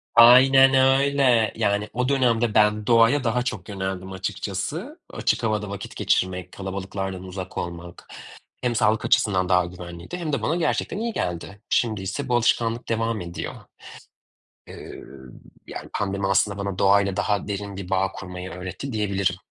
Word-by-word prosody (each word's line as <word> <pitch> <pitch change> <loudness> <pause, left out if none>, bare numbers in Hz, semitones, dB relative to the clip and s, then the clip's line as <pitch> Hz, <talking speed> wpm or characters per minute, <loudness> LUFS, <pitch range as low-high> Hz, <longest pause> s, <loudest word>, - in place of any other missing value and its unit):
Aynen 135 +3 +8 0.3
öyle. 135 -6 +3
Yani, 105 -1 0
o 125 +2 0
dönemde 120 -5 +2
ben 105 0 +3
doğaya 115 +4 +4
daha 125 +1 +1
çok 110 -7 -5
yöneldim, 95 -1 -4
açıkçası. 95 -1 -4
Açık - - -1
havada 105 -2 -1
vakit 100 -1 -7
geçirmek, 90 -2 0
kalabalıklardan 95 -1 -5
uzak 95 0 -7
olmak; 85 0 -7 0.5
hem 125 -2 0
sağlık 110 0 +2
açısından, 95 -3 +2
daha 90 -1 +4
güvenliydi, 85 - -8
hem 165 -4 -4
de 140 - 0
bana 160 - 0
gerçekten 175 +2 -1
iyi 230 +1 -2
geldi. 90 - -4
Şimdiyse 110 +4 -1
bu 120 - +2
alışkanlık 120 0 +1
devam 115 -1 -1
ediyor. 85 0 -6 1.2
Iıı, - - -10 0.6
yani, - - -8
pandemi 100 0 -1
aslında 95 +1 +1
bana 100 -1 -4
doğayla 100 -1 +3
daha 105 0 -1
derin 100 -1 -4
bir 95 -2 -7
bağ 95 0 +1
kurmayı 90 -1 -8
öğretti, 95 +10 -6
diyebilirim. 100 -4 0
100 Hz, 145 wpm, -24 LUFS, 95-115 Hz, 1.2 s, Aynen